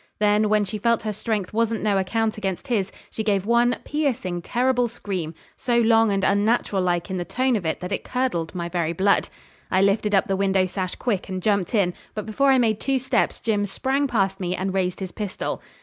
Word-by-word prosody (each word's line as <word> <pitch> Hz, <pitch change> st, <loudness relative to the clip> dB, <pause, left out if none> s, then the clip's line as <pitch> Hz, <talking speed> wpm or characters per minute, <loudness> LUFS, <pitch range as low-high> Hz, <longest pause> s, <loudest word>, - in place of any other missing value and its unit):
Then, 210 Hz, 0 st, +3 dB
when 210 Hz, -1 st, +3 dB
she 210 Hz, +2 st, -5 dB
felt 235 Hz, +2 st, +1 dB
her 215 Hz, -1 st, -2 dB
strength 210 Hz, -2 st, -3 dB
wasn't 230 Hz, 0 st, 0 dB
no 205 Hz, -2 st, +2 dB
account 220 Hz, +3 st, 0 dB
against 195 Hz, -4 st, -3 dB
his, 205 Hz, -6 st, 0 dB, 0.2 s
she 220 Hz, -, -3 dB
gave 200 Hz, -3 st, +1 dB
one 235 Hz, +2 st, +3 dB
piercing, 245 Hz, -, -1 dB
terrible 245 Hz, +5 st, +1 dB
scream, 190 Hz, -8 st, -5 dB, 0.2 s
so 240 Hz, -1 st, 0 dB
long 225 Hz, -2 st, +4 dB
and 195 Hz, 0 st, 0 dB
unnatural 205 Hz, 0 st, +2 dB
like 175 Hz, +1 st, -1 dB
in 190 Hz, -, -2 dB
the 175 Hz, -, -2 dB
tone 255 Hz, +6 st, 0 dB
of 185 Hz, -7 st, -2 dB
it 160 Hz, -, -2 dB
that 180 Hz, +1 st, -5 dB
it 195 Hz, -, -2 dB
curdled 245 Hz, -11 st, -2 dB
my 170 Hz, -1 st, -3 dB
very 170 Hz, -2 st, -1 dB
blood. 195 Hz, +4 st, +2 dB, 0.4 s
I 185 Hz, +1 st, +3 dB
lifted 205 Hz, +1 st, +2 dB
up 195 Hz, -, +3 dB
the 195 Hz, -, +1 dB
window 190 Hz, -1 st, +2 dB
sash 185 Hz, 0 st, -3 dB
quick, 210 Hz, -7 st, -2 dB
and 185 Hz, -1 st, -3 dB
jumped 200 Hz, +1 st, 0 dB
in; 185 Hz, -4 st, +2 dB, 0.2 s
but 215 Hz, -, -4 dB
before 275 Hz, +6 st, +2 dB
I 265 Hz, -, +6 dB
made 220 Hz, -4 st, +2 dB
two 270 Hz, -1 st, 0 dB
steps 260 Hz, +1 st, 0 dB
Jim 205 Hz, -3 st, 0 dB
sprang 270 Hz, +7 st, 0 dB
past 195 Hz, -5 st, 0 dB
me, 180 Hz, -1 st, -2 dB
and 190 Hz, +1 st, -2 dB
raised 185 Hz, -1 st, -1 dB
his 185 Hz, -2 st, -4 dB
pistol. 205 Hz, -4 st, -4 dB
205 Hz, 215 wpm, -23 LUFS, 190-230 Hz, 0.4 s, I